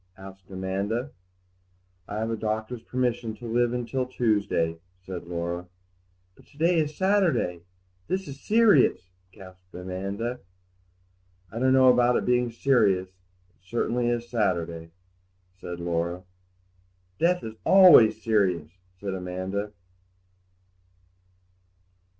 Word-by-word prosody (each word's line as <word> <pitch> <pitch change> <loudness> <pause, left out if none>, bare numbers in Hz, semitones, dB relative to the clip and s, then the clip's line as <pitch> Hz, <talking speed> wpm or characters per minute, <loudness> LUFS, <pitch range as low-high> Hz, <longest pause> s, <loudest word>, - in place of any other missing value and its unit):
asked 95 -1 -13
Amanda. 100 +7 -3 1.0
"I 105 - -5
have 110 +1 -2
the 115 - -1
doctor's 110 +2 -3
permission 120 -3 -2
to 120 - -11
live 120 +1 0
till 130 +2 -2
Tuesday," 105 -9 0 0.3
said 90 -3 -7
Laura. 85 +1 -4 0.7
"But - - -22
to - - -23
day 165 +2 +3
is 150 -1 -2
Saturday; 190 - +1 0.5
this 190 0 -2
is 140 -1 -9
serious!" 210 - +3 0.2
gasped 95 -1 -15
Amanda. 100 +7 -4 1.1
"I 115 - -5
don't 130 +1 +3
know 130 -1 +6
about 125 0 +3
it - - -2
being 125 0 +2
serious; 110 -7 +2
it 90 0 -38
is 95 - -26
certainly 120 +1 0
Saturday," 85 -8 -2 0.7
said 85 -2 -7
Laura. 85 +1 -2 1.0
"Death 180 +1 +2
is 110 - -6
always 160 - +7
serious," 95 -8 +1 0.3
said 100 0 -4
Amanda. 95 +3 -4
110 Hz, 115 wpm, -26 LUFS, 90-125 Hz, 1.1 s, always